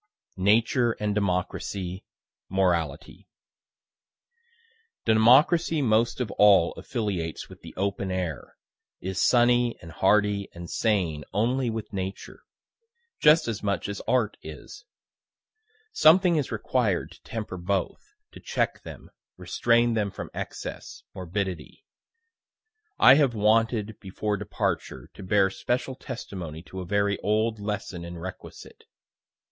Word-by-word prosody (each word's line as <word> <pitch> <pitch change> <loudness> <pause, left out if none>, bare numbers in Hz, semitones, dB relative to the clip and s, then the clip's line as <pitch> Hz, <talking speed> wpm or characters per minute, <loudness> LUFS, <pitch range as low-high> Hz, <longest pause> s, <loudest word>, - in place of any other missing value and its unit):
NATURE 115 +5 +3
AND 105 -1 -2
DEMOCRACY 95 -1 -2 0.5
MORALITY 85 -4 -1 1.8
Democracy 135 +9 +4
most 115 0 +2
of 120 -5 -2
all 100 -5 +6
affiliates 100 - -4
with - - -14
the - - -12
open 100 0 -2
air, 90 -6 -4 0.4
is 95 +1 -3
sunny 120 -1 +3
and 85 - -11
hardy 100 +2 +2
and 85 0 -8
sane 90 -9 0
only 120 +4 +1
with 110 -1 -5
Nature 95 0 -6 0.8
just 155 0 +5
as 110 -3 -3
much 100 -1 -1
as 100 -1 -5
Art 115 -5 +1
is. 80 - -11 1.1
Something 175 - +5
is 145 -5 -1
required 110 -2 -1
to - - -16
temper 110 -5 -6
both 95 +2 -2 0.3
to - - -12
check - - -2
them, - - -11 0.3
restrain 120 0 +2
them 105 -2 0
from - - -8
excess, - - -7
morbidity. 90 -2 -5 1.1
I 130 - +8
have 140 -4 +3
wanted, 110 0 +1
before 105 +2 -3
departure, 100 -10 -3
to - - -12
bear 95 0 +2
special 120 +7 -2
testimony 90 - -7
to 95 +1 -9
a 90 - -5
very 100 +1 +1
old 110 +1 0
lesson 100 -4 -4
and 85 0 -8
requisite. 95 +2 -10
105 Hz, 120 wpm, -26 LUFS, 95-115 Hz, 1.8 s, I